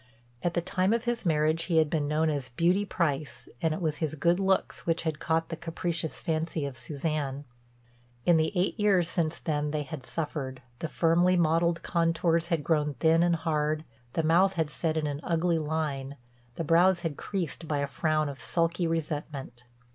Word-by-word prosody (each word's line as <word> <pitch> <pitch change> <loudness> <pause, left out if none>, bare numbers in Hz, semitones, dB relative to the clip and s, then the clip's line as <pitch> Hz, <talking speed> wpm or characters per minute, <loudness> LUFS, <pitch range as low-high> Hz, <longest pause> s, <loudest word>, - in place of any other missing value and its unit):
At 175 -1 -1
the 175 - +2
time 185 +4 +1
of 230 0 0
his 240 -4 -1
marriage 155 +1 +2
he 170 -3 +1
had 160 -1 +5
been 150 -1 -1
known 155 +1 +2
as 140 -3 -3
"Beauty 175 +10 +2
Price" 155 -7 -2
and 160 - +2
it 155 - -2
was 155 -4 -1
his 155 -2 -2
good 170 +4 +2
looks 190 -2 0
which 165 0 +1
had 160 -2 -2
caught 165 0 0
the 165 - -3
capricious 165 -1 -2
fancy 160 -2 -1
of 140 -2 -5
Suzanne. 145 +1 -3 0.8
In 170 -2 +5
the 160 0 +2
eight 185 +5 0
years 190 -5 +3
since 165 -1 0
then 150 -2 -1
they 150 0 -1
had 145 -1 -7
suffered, 140 -5 -4 0.2
the 165 - -2
firmly 175 +3 +3
modeled 170 0 +2
contours 165 -1 +1
had 165 -3 0
grown 150 -3 +1
thin 160 +6 +3
and 175 0 +3
hard, 155 -1 -1 0.3
the 165 - 0
mouth 180 +5 +4
had 160 -4 -1
set 160 0 -1
in 155 - 0
an 145 -1 -2
ugly 170 0 +1
line, 150 -3 -2 0.4
the - - -2
brows 175 +3 +4
had 165 -4 -2
creased 175 -3 -4
by 150 - 0
a 140 - 0
frown 155 +2 0
of 135 -4 -7
sulky 165 +6 0
resentment. 145 -6 -4
160 Hz, 190 wpm, -28 LUFS, 150-170 Hz, 0.8 s, had